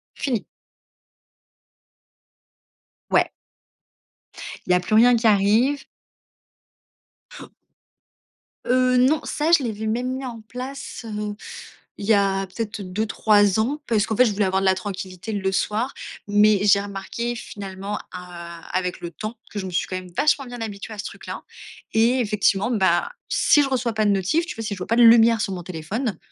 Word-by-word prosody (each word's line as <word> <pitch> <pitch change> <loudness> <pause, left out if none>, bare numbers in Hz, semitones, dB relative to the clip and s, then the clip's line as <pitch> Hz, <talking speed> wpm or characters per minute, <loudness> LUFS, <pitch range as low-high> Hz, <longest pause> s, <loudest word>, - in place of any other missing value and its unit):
Fini. 245 -7 -2 2.7
Ouais. - - +3 1.4
Il - - +1
y - - +6
a - - +3
plus 180 +4 -4
rien 240 +2 +7
qui 230 0 -1
arrive. 220 +7 +3 2.8
Heu, 255 0 +3
non, 280 +5 +3
ça, 305 +2 -1
je 335 -5 +5
l'avais 220 -2 -3
même 245 +4 -1
mis 270 - -6
en 235 -3 -7
place, 255 +3 -7
heu, 210 -1 -4 0.6
il 200 - -6
y 220 - +5
a 195 -1 +1
peut-être 215 +3 -5
2-3 205 +1 +2
ans 270 +7 0
parce 220 -2 +1
qu'en 220 - -2
fait, 250 - +6
je 220 - +1
voulais 205 0 +1
avoir 190 +1 +1
de - - -1
la 190 0 +4
tranquillité 185 +1 -6
le 195 -2 -1
soir. 220 +7 -1 0.4
Mais 210 0 +4
j'ai 200 -1 +5
remarqué 205 +4 -4
finalement, 200 -2 -6
a 170 -2 -9
heu, - - -14
avec 180 0 -2
le 170 - -6
temps, 215 +7 -6 0.2
que 210 - -4
je 190 - -4
me - - -5
suis 180 - -1
quand 185 - -4
même 185 -1 -8
vachement 295 -2 +2
bien 245 -1 -8
habituée 215 0 -6
à - - -12
ce 210 - -4
truc - - -9
là - - -6 0.5
et 235 +4 +3
effectivement, 210 -1 +1
bah, 225 - +2 0.2
si 295 - +4
je 275 - 0
reçois 250 -3 0
pas 215 -1 +1
de - - +4
notifs, 200 - +1
tu - - -6
vois, 225 - -6
si 215 - -3
je - - -10
vois 180 - -5
pas 230 - +1
de 240 - +6
lumière 230 -1 +6
sur 195 - -2
mon 180 -2 -5
téléphone, 185 - -4
215 Hz, 180 wpm, -23 LUFS, 195-240 Hz, 2.8 s, rien